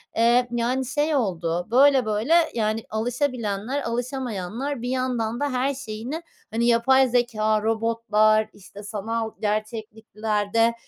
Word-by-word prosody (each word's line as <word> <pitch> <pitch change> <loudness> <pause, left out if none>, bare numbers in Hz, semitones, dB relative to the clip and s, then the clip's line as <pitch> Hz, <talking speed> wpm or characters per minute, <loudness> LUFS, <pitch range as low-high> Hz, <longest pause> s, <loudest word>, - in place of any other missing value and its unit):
eee, 240 +2 +4
yani 245 +2 0
şey 295 +4 0
oldu. 175 -7 -1
Böyle, 265 0 +5
böyle 220 +10 +1 0.2
yani 220 -1 -1
alışabilenler, 240 +1 -2
alışamayanlar, 245 +1 -3
bir 245 - -3
yandan 245 -3 -1
da 290 0 0
her 265 +3 +1
şeyini 255 +4 -6 0.3
hani 230 +2 0
yapay 260 +3 +4
zekâ, 220 -3 +1
robotlar, 220 -1 +2
işte 205 +1 -13
sanal 220 +2 -3
gerçekliklerde 215 +1 -1
230 Hz, 115 wpm, -24 LUFS, 215-255 Hz, 0.3 s, Böyle